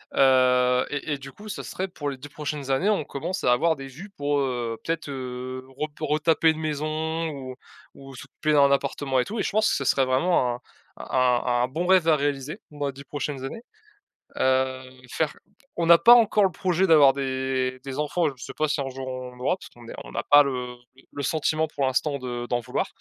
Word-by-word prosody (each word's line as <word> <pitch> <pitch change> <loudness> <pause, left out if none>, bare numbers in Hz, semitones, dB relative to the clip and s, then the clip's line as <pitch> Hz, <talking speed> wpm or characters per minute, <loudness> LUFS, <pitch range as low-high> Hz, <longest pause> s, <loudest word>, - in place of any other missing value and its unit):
Heu 125 -1 +4
et 145 +1 -3
et - - -2
du 135 0 -10
coup, 210 +6 -12
ça - - -5
serait 190 +1 -4
pour 145 -5 -5
les 135 - -6
10 140 +3 -11
prochaines 145 -2 -4
années 155 +10 +2
on 205 -7 +1
commence 160 +8 -4
à - - +4
avoir 160 +6 +2
des 135 -2 -8
vues 160 +10 -11
pour, 145 0 0
heu, 120 -4 -2
peut-être, 165 -2 -3
heu, 130 -1 -6
rep 150 +1 -3
pour 155 - -4
retaper 160 +1 +3
une 160 - 0
maison 155 +2 -2
ou 130 -3 -7 0.4
ou 135 -1 -12
s'occuper 155 +4 -3
d'un 140 -1 +5
appartement 140 -1 0
et 125 - +1
tout 225 +2 -5
et - - +1
je - - -1
pense 215 +1 +2
que - - +1
ce 140 - -2
serait 135 0 +3
vraiment 130 -1 +2
un - - -10 0.4
un - - -8 0.4
un 120 -1 +2
un - - +1
bon 160 +7 -3
rêve 185 -3 +4
à 160 - +6
réaliser 140 0 -2
dans 145 -1 -3
les 135 - -4
10 140 - -11
prochaines 140 -1 -5
années. 180 +12 -6 0.8
Heu, 130 0 +1 0.3
faire 155 +2 -1 0.4
on 170 - 0
n'a 170 0 +8
pas 235 +7 +8
encore 220 -3 +5
le 190 - +3
projet 185 +1 +1
d'avoir 145 -4 +7
des 130 -1 -2
des 135 -1 -5
enfants, 160 +3 0
je 125 - -11
sais - - -8
pas 155 - 0
si 145 -1 -1
on 135 - -3
jour 130 0 -7
on 130 -1 -6
en 125 - -17
aura, 130 +8 +1
parce 185 - -13
qu'on 120 -1 -16
est - - -8
on - - -11
n'a - - -3
pas 145 0 +8
le 125 -2 -4 0.4
le 140 - -5
sentiment 155 +2 0
pour 140 -2 -2
l'instant 140 +3 0
de 120 -1 -5
d'en 120 - 0
vouloir. 125 +1 -2
140 Hz, 230 wpm, -25 LUFS, 130-155 Hz, 0.8 s, n'a